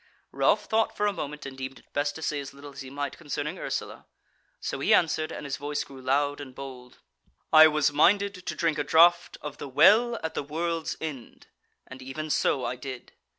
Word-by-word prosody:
Ralph - - +2
thought 220 0 0
for 210 - +1
a 205 - +1
moment, 150 -4 -6
and 135 -1 -7
deemed 130 0 -6
it - - -22
best 145 0 0
to 160 - -7
say 150 - -1
as 140 0 -8
little 140 0 -11
as 135 - -8
he 130 - -8
might 140 +1 -5
concerning 150 +1 -4
Ursula; - - -5 0.5
so - - -4
he - - +4
answered, 155 -2 +1
and - - -7
his 140 -1 -3
voice 145 +1 -3
grew 135 -1 -12
loud 145 +2 0
and 130 -3 -10
bold: 130 -2 -10 0.6
"I 155 0 +10
was 150 -1 +1
minded 200 +7 +4
to - - -2
drink 160 -3 0
a - - +1
draught 170 +4 +4
of 145 -1 -7
the 140 - -6
WELL 225 - +5
at 160 - -3
the - - -2
WORLD'S 165 +3 -3
END, 145 -7 -7 0.4
and 130 0 -11
even 150 +4 -5
so 135 -3 +1
I 125 - -3
did." 130 -1 -8
145 Hz, 210 wpm, -27 LUFS, 135-160 Hz, 0.6 s, I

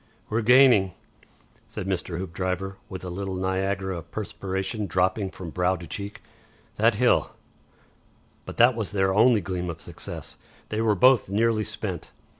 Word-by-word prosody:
"We're 110 +2 +1
gaining," 120 -5 +6 0.7
said - - -6
Mr. 90 -2 -2
Hoopdriver, 95 +2 -3
with 95 -1 -7
a 90 - -5
little 95 +1 -4
Niagara 95 0 -1
of 85 +1 -14
perspiration 100 0 -4
dropping 95 +3 +1
from 90 -3 -8
brow 90 +2 +1
to 85 -1 -9
cheek. 100 +6 -6 0.5
"That - - +4
hill - - +2 0.5
" - - -36
But - - -7
that 120 +2 +6
was 110 -3 -3
their 95 -1 +2
only 110 +1 +5
gleam 90 -2 -3
of 85 - -6
success. - - -8 0.3
They 110 +1 -1
were 110 -2 +3
both 125 +1 +5
nearly 110 +2 +2
spent. - - -5
95 Hz, 155 wpm, -25 LUFS, 95-105 Hz, 0.7 s, gaining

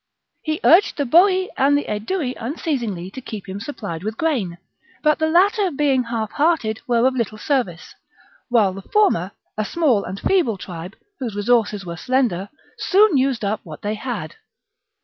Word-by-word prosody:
He 310 0 -2
urged 355 +6 +5
the 285 - +1
Boii 370 +7 +4
and 285 +2 +4
the 290 - -2
Aedui 250 - -2
unceasingly 230 - -3
to 260 - -8
keep 215 -6 -8
him 190 +1 -5
supplied 205 - -6
with 215 +1 -4
grain: 235 - -1 0.5
but 305 0 +3
the 315 0 +1
latter, 390 +4 +3
being 275 -4 +1
half 225 -2 -3
hearted, 285 -9 +1
were 240 -1 +3
of 260 - +3
little 225 -4 -2
service; 215 - -2 0.6
while 215 -6 +3
the 195 - -8
former, 200 - +1 0.3
a - - +2
small 255 -4 +1
and 190 +2 -6
feeble 335 - +1
tribe, 180 +1 -8 0.2
whose 235 -6 -4
resources 210 -2 +1
were 170 -1 -6
slender, 220 -5 0 0.3
soon 400 -2 +4
used 260 -5 +1
up 210 +2 -1
what 155 -3 -10
they 205 +1 -1
had. 210 -8 -5
240 Hz, 170 wpm, -21 LUFS, 205-300 Hz, 0.6 s, urged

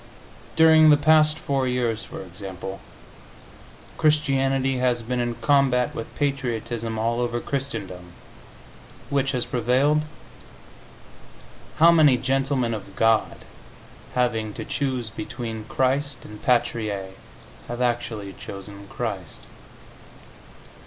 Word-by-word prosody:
During 160 -1 +7
the 150 - +7
past 155 +1 +4
four 135 -2 -1
years, 120 -3 -1
for - - -8
example, 95 +1 -8 1.2
Christianity 135 -3 +2
has 125 -2 +1
been 125 +2 -2
in 120 -1 -1
combat 135 -3 +2
with 115 - -7
patriotism 120 -5 -2
all 115 +2 0
over 120 0 -1
Christendom. 95 -11 -5 1.0
Which 140 -1 +1
has 125 -2 -1
prevailed? 130 +6 +2 1.8
How 165 +2 +7
many 150 -6 +5
gentlemen 135 -1 0
of 100 -2 -7
God, 115 -1 +1 0.7
having 115 -4 0
to - - -6
choose 130 -5 -2
between 110 +1 -6
Christ 135 +3 -1
and 105 0 -11
Patrie, 120 -4 +1 0.8
have 120 0 -5
actually 120 -5 -2
chosen 100 +1 -9
Christ? 100 -7 -5
125 Hz, 105 wpm, -24 LUFS, 110-135 Hz, 1.8 s, During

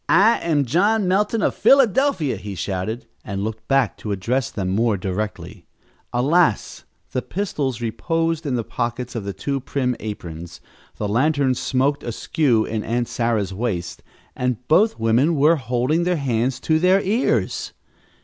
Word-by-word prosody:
"I 220 +4 +5
am 150 -4 +1
John 200 - +2
Melton, 210 +4 +1
of - - +2
Philadelphia," 265 - +3
he 100 -2 -7
shouted, 95 +7 -3 0.2
and 100 -1 -4
looked 110 +1 -5
back 135 -5 +2
to 105 - -5
address 115 +6 -1
them 95 -3 -3
more 110 +2 +1
directly. 100 +3 -5 0.4
Alas, 130 - +1 0.3
the 130 - -1
pistols 140 - -3
reposed 165 +8 -1
in 130 - 0
the 115 - -1
pockets 120 +2 -4
of 115 -5 -4
the 100 - -2
two 140 +5 -2
prim 130 -1 -1
aprons, 85 -5 -7 0.4
the 105 - -3
lantern 135 +4 +2
smoked 135 +3 0
askew 120 0 0
at 110 -1 -3
Aunt 120 +2 -1
Sarah's 110 -5 -1
waist, 95 -5 -3 0.3
and 125 -1 -2
both 210 +8 +4
women 120 +9 +3
were 155 +3 +4
holding 130 +6 0
their 180 0 +1
hands 125 -2 -1
to 160 -1 +2
their 185 +3 +4
ears! 220 +7 0
125 Hz, 150 wpm, -22 LUFS, 110-160 Hz, 0.4 s, I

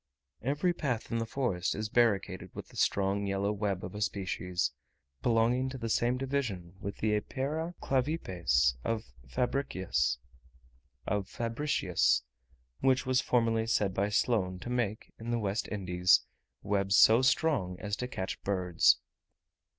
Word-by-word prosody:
Every 145 - +1
path 130 -9 -3
in 115 - 0
the 115 - -2
forest 110 -9 -1
is 110 +1 -2
barricaded 105 -5 +1
with - - -7
the - - -17
strong 100 +1 +1
yellow 100 +1 0
web 100 -3 -2
of 90 - -8
a 105 - -6
species, 90 -5 -1 0.5
belonging 120 +3 +2
to 130 - -6
the 115 -2 -4
same 120 +3 +2
division 125 -10 -2
with 100 -1 -5
the 110 -1 +1
Epeira 150 +10 -2
clavipes 90 - +1
of 115 -1 -1 0.3
Fabricius, 95 - 0 2.6
which 130 0 +2
was 130 0 +2
formerly 115 -2 +1
said 100 -4 +1
by 100 +2 0
Sloane 105 -3 +1
to 120 - -5
make, 115 -4 -2
in 115 +1 -6
the 120 - +1
West 105 0 -1
Indies, 90 -3 +3 0.4
webs 100 -1 +2
so 115 +3 +7
strong 125 - +1
as 105 -1 -2
to 125 - -3
catch 95 -7 -4
birds. 90 -3 +3
105 Hz, 135 wpm, -31 LUFS, 95-125 Hz, 2.6 s, so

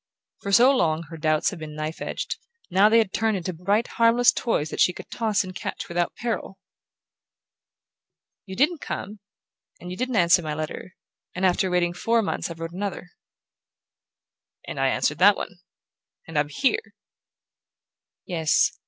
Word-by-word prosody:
For 200 - -4
so 250 +7 +6
long 160 -6 +1
her - - -6
doubts 155 +4 +1
had 190 - -8
been 155 -1 -8
knife 155 +1 -5
edged: - - -4 0.3
now 195 +4 +5
they 225 - +5
had 220 -5 +2
turned 220 -2 +1
into 185 0 -4
bright 200 +7 +1
harmless 230 +1 +4
toys 155 - -1
that - - -5
she 180 - +4
could - - -11
toss 220 -3 0
and 185 0 -8
catch - - -5
without 175 0 -1
peril! 230 -4 -4 1.9
"You 190 - -7
didn't 300 - +2
come, 205 +2 -5 0.6
and 180 - -8
you 180 - -6
didn't 255 0 -2
answer 175 -2 +5
my 155 -2 -4
letter; 155 +4 -6 0.4
and 185 +1 0
after 185 +1 +2
waiting 175 -1 +1
four 230 +5 +1
months 195 - -2
I 170 - -6
wrote 165 0 -6
another." 185 -2 -5 1.6
"And - - -5
I - - +3
answered - - 0
that - - +6
one; - - -7 0.7
and 160 - -10
I'm 145 0 +1
here." 275 - -1 1.3
"Yes." 165 -4 +2
185 Hz, 160 wpm, -25 LUFS, 165-225 Hz, 1.9 s, so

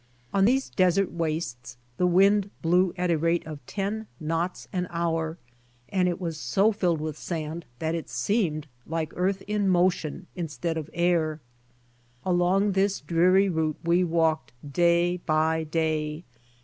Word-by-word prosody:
On 195 -1 +4
these 265 +4 +2
desert 185 +1 +2
wastes 155 -8 -3 0.2
the 180 - +3
wind 195 +3 +4
blew^ 180 +2 +3
at 180 0 +1
a 165 - +2
rate 165 +2 +1
of 155 -3 -8
ten 210 +2 -3
knots 165 +3 -2
an 180 -1 -1
hour 165 -1 -1 0.5
and 185 -2 +2
it 175 - -3
Avas 165 -4 -3
so 200 +6 +2
filled 180 -6 0
with 155 -1 -4
sand 160 0 -5
that 160 +3 -1
it 165 -1 -4
seemed 170 -9 0 0.2
like 160 -1 -3
earth 190 +2 0
in 205 -1 0
motion 180 -2 +1
instead 165 -1 -3
of 160 -1 -4
air. 165 -3 +1 0.9
Along 185 +3 +2
this 195 +1 +1
dreary 180 +6 +3
route 160 -4 0
we 170 +2 +3
walked 160 -7 +1 0.2
day 175 +1 +3
by 160 -1 +1
day. 155 0 -1
170 Hz, 150 wpm, -26 LUFS, 160-185 Hz, 0.9 s, On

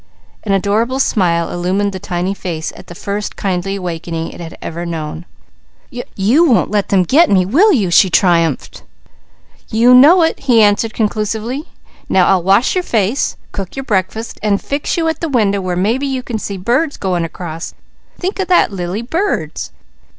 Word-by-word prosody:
An 205 - -2
adorable 210 +6 +1
smile 170 -10 +1
illumined 190 +3 -1
the 190 - -5
tiny 180 +1 -2
face 165 -5 -5
at 185 - -13
the 175 - -10
first 205 +3 -4
kindly 195 0 -2
awakening 170 -3 -4
it 165 -1 -9
ever 165 - -6
had 175 - -4
known. 160 0 -5 0.7
"You 245 - +1
won't 255 -12 +2
let 205 -2 0
them 190 -2 +3
'get' 305 - +4
me, 185 -2 +3
will 340 - +4
you?" 205 - +1
she 185 +2 +5
triumphed. 165 -4 +1 0.9
"You 235 +3 +4
know 310 +8 +7
it!" 325 - 0
he 250 -4 +3
answered 210 +2 +2
conclusively. 220 +5 -2 0.4
"Now 185 -1 +4
I'll 190 -2 +3
wash 195 +7 +3
your 365 - 0
face, 225 - 0
cook 195 -2 -6
your 270 0 -5
breakfast, 215 +2 -2
and 205 -2 +1
fix 285 +5 -3
you 330 -1 0
at 320 -2 -1
the 330 - -2
window 205 -7 +1
where 180 -1 -2
maybe 225 +10 0
you 260 -2 -3
can 230 -3 -4
see 200 -1 -5
birds 250 - 0
going 180 -3 -1
across. 165 -1 -7 0.4
Think 380 +2 -4
of 380 - -1
that, 355 - +3
Lily! 185 +3 -4
Birds!" 350 - -2
200 Hz, 175 wpm, -16 LUFS, 180-250 Hz, 0.9 s, know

